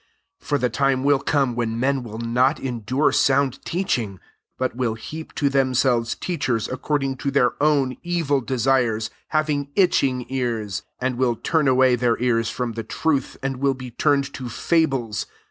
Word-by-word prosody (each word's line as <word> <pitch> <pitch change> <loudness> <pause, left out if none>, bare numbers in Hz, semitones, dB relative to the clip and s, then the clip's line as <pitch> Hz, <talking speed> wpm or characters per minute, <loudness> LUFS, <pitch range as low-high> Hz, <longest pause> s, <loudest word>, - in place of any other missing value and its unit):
3 - - -20
For 145 - +2
the 125 -2 0
time 135 +1 +1
will 140 -1 +4
come 135 -3 +1
when 115 -1 -2
men 135 +1 +1
will 110 -3 -8
not 125 +5 +1
endure 130 +3 0
sound 135 -1 +2
teaching; 120 - -2 0.4
but 130 -1 -2
will 120 -3 -1
heap 155 +8 -8
to 145 - +1
themselves 130 -3 +2
teachers 135 -10 -1
according 135 0 -2
to 140 - -2
their 130 -3 +3
own 140 -4 +2
evil 165 -6 0
desires, 120 -3 +1 0.2
having 150 -2 0
itching 135 -10 +2
ears; 115 -6 -2 0.2
4 130 - +1
and 125 - -5
will 125 -2 +2
turn 155 +5 +1
away 130 -1 +4
their 120 -1 +1
ears 115 -2 +1
from 125 -2 -3
the 115 0 -5
truth, 140 +4 -1
and 135 -1 -2
will 135 +1 +1
be 125 -1 -8
turn 140 +4 +2
ed 140 0 -8
to 125 -2 -6
fables. 135 - 0
130 Hz, 175 wpm, -23 LUFS, 120-140 Hz, 0.4 s, will